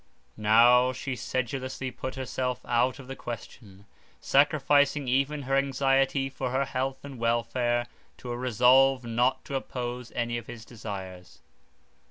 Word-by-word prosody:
Now 120 +4 +5
she 130 +1 -4
sedulously 130 +1 -3
put 130 +1 -6
herself 130 -1 -3
out 125 +1 +1
of 135 - -11
the 135 - -6
question, 105 -5 -9 0.3
sacrificing 145 -1 +3
even 140 +3 0
her 135 +1 0
anxiety 135 0 +2
for 130 -1 -3
his 140 - -1
health 135 +1 -3
and 135 -3 -9
welfare 120 +1 0 0.3
to 125 - -9
her 120 - -2
resolve 130 +2 +4
not 120 +3 0
to - - -8
oppose 125 -2 -4
any 120 -1 -2
of 115 - -14
his 115 -2 -9
desires. 95 -7 -9
125 Hz, 140 wpm, -27 LUFS, 120-135 Hz, 0.3 s, Now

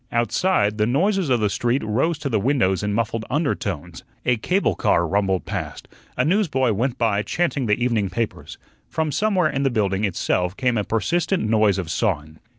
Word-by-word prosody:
Outside 120 - +1
the 105 - +3
noises 185 - +1
of 125 -3 +2
the 105 - +2
street 120 +6 0
rose 130 +10 0
to 145 - -4
the 115 -6 +1
windows 110 -6 +1
in 105 0 -1
muffled 115 +1 -1
undertones, 145 +2 -2 0.2
a 125 -1 +2
cable 185 - +1
car 85 - +2
rumbled 95 0 0
past, - - -5 0.3
a - - +2
newsboy 155 - +2
went 125 +5 -1
by 110 -4 +1
chanting 140 -1 -1
the 105 - +3
evening 115 -5 0
papers; 110 +4 -4 0.3
from 160 -1 -1
somewhere 185 0 +1
in 135 0 -2
the 135 - +2
building 100 -4 0
itself 90 -1 -1
came 125 -2 +1
a 105 - 0
persistent 160 - 0
noise 110 -3 +3
of 90 -4 -3
sawing. 80 -7 -2
115 Hz, 180 wpm, -22 LUFS, 105-145 Hz, 0.3 s, the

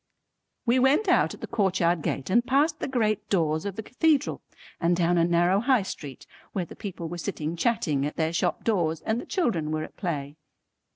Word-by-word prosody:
We 245 +1 +3
wont 275 +11 +3
out 360 - +3
at - - -19
the - - -3
courtyard 180 -5 +1
gate 140 +3 -3
and 235 +4 +4
past 295 +5 +2
the - - -2
great 215 -5 0
doors 160 -4 +1
of 200 -2 -3
the 220 - -5
cathedral 295 +4 +1 0.4
and 175 +1 +2
down 175 0 +2
a - - +4
narrow 175 +3 +3
High 250 -1 +3
Street 145 -8 -8 0.3
where 185 -3 -1
the - - -12
people 185 -5 -6
were 175 +1 -6
sitting 160 0 -3
chatting 170 - 0
at 150 - -7
their 160 0 0
shop - - 0
doors 165 -8 0
and 225 +2 -1
the - - -12
children 230 - 0
were 155 0 -1
at - - -11
play. 150 -5 -4
185 Hz, 205 wpm, -26 LUFS, 165-235 Hz, 0.4 s, and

